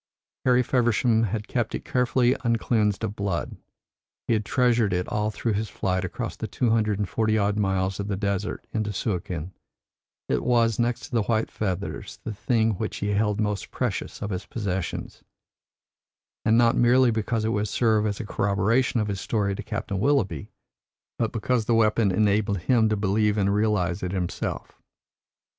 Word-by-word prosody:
Harry 125 -1 +4
Feversham 120 -2 +2
had 105 +1 -3
kept 120 -3 -1
it - - -6
carefully 125 0 +2
uncleansed 110 -3 +1
of 100 - -2
blood; 100 -5 -3 0.7
he - - +1
had 110 -1 +1
treasured 120 -4 +2
it 90 0 -1
all 105 0 0
through 110 +1 -2
his 105 +2 -2
flight 95 -2 -1
across 90 - -4
the - - -5
two 120 -3 0
hundred 110 -3 +2
and 105 -1 -1
forty 110 +1 +1
odd 100 0 +1
miles 95 -1 0
of 100 -1 -2
desert 100 0 -2
into 110 -1 -1
Suakin; 90 -4 -3 0.7
it - - 0
was, 115 -3 +2
next 120 0 0
to - - -10
the 115 -2 +2
white 110 +1 0
feathers, 100 -2 -4
the 110 - -4
thing 115 +1 +1
which 110 - -3
he 100 - -2
held 105 0 +1
most 105 -1 -1
precious - - -3
of 105 - -3
his 90 -2 -4
possessions, 95 -5 -4 1.2
and 110 +1 +4
not 120 -1 +4
merely 125 +1 +5
because 110 0 -1
it - - +1
would 105 -1 0
serve 110 -1 +2
as 100 -1 -3
a - - -4
corroboration 105 +6 +1
of 105 - 0
his 100 -2 -3
story 100 -3 0
to - - -5
Captain 105 -3 -4
Willoughby, 105 - +1 0.7
but 115 -2 0
because 115 +1 0
the 115 - +2
weapon 110 -1 +3
enabled 105 +1 +2
him 115 -1 +3
to 110 - +1
believe 105 +1 +1
and 100 -1 +2
realise 100 -5 +1
it 90 0 -3
himself. 90 -2 -4
105 Hz, 175 wpm, -25 LUFS, 100-115 Hz, 1.2 s, merely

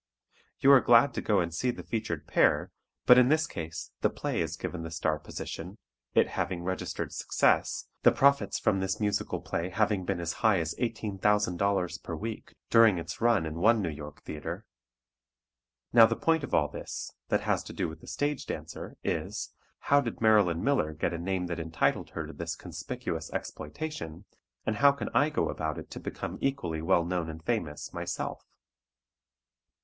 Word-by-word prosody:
You 135 - +7
are 135 -2 +8
glad 120 +3 +6
to - - -2
go 105 -3 +2
and 85 -1 -3
see 125 +9 0
the 120 - -4
featured 115 -2 -3
pair, - - +3 0.3
but 125 0 +9
in 125 0 +5
this 155 +1 +3
case 85 0 -6
the - - +3
play - - -2
is - - -3
given 90 - -4
the 80 - -5
star 80 -2 -1
position, 90 +5 -7 0.4
it - - +5
having 85 -2 -2
registered 95 +1 -3
success, - - +1 0.2
the - - +7
profits 140 -8 +3
from 95 - +1
this 95 0 -1
musical 105 -1 -1
play 85 +2 -3
having 105 -1 +1
been 95 -1 -2
as 85 -1 -2
high 110 -4 +5
as 80 -1 -2
$18,000.00 100 -5 0
per 85 - -5
week 110 +6 -6 0.2
during 115 -5 +6
its 85 - -6
run 115 -7 +3
in 80 +1 -5
one 115 +5 +5
New 90 -6 -1
York 75 -1 -9
theatre. 75 -1 -6 1.3
Now 115 -1 +9
the 115 - -1
point 160 +7 +1
of - - -5
all 75 - +3
this, 75 - -6 0.2
that - - +2
has - - +1
to - - -8
do - - -2
with 80 0 -9
the - - -14
stage 145 -1 -2
dancer, - - -6
is, - - -3 0.3
"How 140 0 +4
did 115 -5 -5
Marilyn 105 -7 +4
Miller 135 - +1
get 80 - -1
a 85 - -3
name 90 +1 -1
that 85 -1 -4
entitled 80 0 0
her 80 - -2
to 80 - -9
this 85 0 -4
conspicuous - - -5
exploitation, 85 - -5 0.4
and 110 - 0
how 140 0 +6
can 140 - -4
I 145 - +4
go 150 - 0
about 80 -1 -3
it - - -9
to - - -6
become - - -5
equally 85 - -1
well 85 +1 +3
known 85 -2 -2
and 80 0 -9
famous, 85 -11 -2
myself?" - - -4
95 Hz, 185 wpm, -29 LUFS, 85-115 Hz, 1.3 s, but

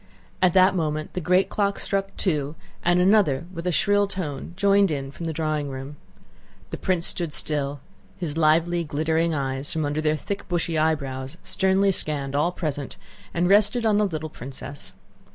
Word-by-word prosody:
At 185 -1 +4
that 185 +1 +6
moment 155 -3 -2
the 180 - -3
great 180 +3 +3
clock 200 -1 0
struck 195 0 -2
two 150 -5 0 0.3
and 175 +1 +3
another 180 -7 +3
with 170 0 -5
a - - +2
shrill 205 +4 +3
tone 170 -6 -5
joined 200 0 +4
in 135 -3 -3
from 165 +3 -6
the - - -1
drawing 155 -2 -1
room. 135 +2 -7 0.8
The - - -3
prince 180 -3 0
stood 170 -3 0
still; 145 -2 -2 0.4
his 155 -4 -3
lively 165 +2 +3
glittering 160 +2 0
eyes 135 0 -2
from 155 -2 -1
under 145 +2 -1
their 155 0 +1
thick, 200 +5 -5
bushy 170 -2 -1
eyebrows 140 -2 -1
sternly 190 +1 +2
scanned 145 -6 -2
all 155 +5 +2
present 145 -6 -4 0.3
and 175 +1 +1
rested 210 +4 +4
on 210 -2 +4
the 210 - +3
little 155 -3 -4
princess. 135 +2 -8
160 Hz, 170 wpm, -24 LUFS, 145-185 Hz, 0.8 s, that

